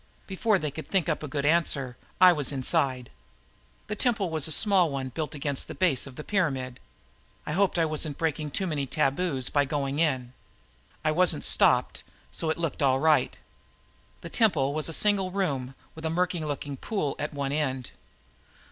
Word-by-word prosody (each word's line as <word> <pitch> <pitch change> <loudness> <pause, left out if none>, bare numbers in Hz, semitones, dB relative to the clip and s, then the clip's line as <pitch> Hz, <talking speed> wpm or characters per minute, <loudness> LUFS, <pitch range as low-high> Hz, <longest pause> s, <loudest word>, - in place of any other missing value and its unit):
Before 205 +2 +1
they 150 -5 -3
could 155 0 -8
think 190 -4 +1
up 155 - -1
a 150 - -5
good 140 +1 -3
answer, 145 -5 +1 0.2
I 185 -1 +8
was 145 -4 0
inside. 130 -2 0 0.7
The 210 - -4
temple 210 -6 0
was 155 -2 +2
a - - -2
small 190 0 +5
one 135 -2 -4
built 155 +4 -5
against 140 -1 -2
the - - -8
base 155 -8 +1
of 135 - -11
the 150 - -7
pyramid. 135 -11 -2 0.7
I - - -4
hoped 190 +3 +1
I 165 - +3
wasn't 155 -2 -2
breaking 155 -2 -2
too 190 +6 -1
many 150 -6 -2
taboos 140 -1 0
by 145 -1 +2
going 140 0 -2
in. 130 -6 0 0.7
I 155 - +3
wasn't 170 - +3
stopped, - - +2 0.3
so 160 - -3
it 155 - -1
looked 165 -4 -3
all 135 -1 +3
right. 155 +1 +2 0.8
The - - -8
temple 150 - +2
was 155 +1 0
a - - -4
single 195 +2 +3
room 140 -9 -2 0.2
with 160 - -11
a 160 - -1
murky 175 +1 0
looking 145 -2 -5
pool 175 -7 -3
at 150 - -3
one 140 -2 -3
end. 135 -4 -2
150 Hz, 185 wpm, -27 LUFS, 135-175 Hz, 0.8 s, I